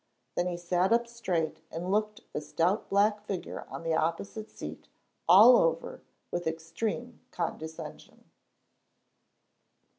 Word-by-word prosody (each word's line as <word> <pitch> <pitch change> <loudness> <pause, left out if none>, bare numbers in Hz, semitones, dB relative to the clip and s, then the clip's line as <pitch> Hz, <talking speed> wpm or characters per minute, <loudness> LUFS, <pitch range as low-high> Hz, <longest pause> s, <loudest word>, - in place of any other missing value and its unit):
Then 175 - 0
he 175 -1 -2
sat 175 +2 +1
up 235 +1 +4
straight 185 -11 -2
and 175 +3 -4
looked 215 +2 0
the - - -2
stout 170 +7 0
black 205 +1 +3
figure 190 -3 -5
on - - -7
the 165 0 0
opposite 170 +7 -1
seat - - -8 0.4
all 220 +7 +10
over 165 0 0 0.3
with 175 -1 -2
extreme 205 +9 -3
condescension. 160 -4 -6
180 Hz, 120 wpm, -30 LUFS, 165-215 Hz, 0.4 s, all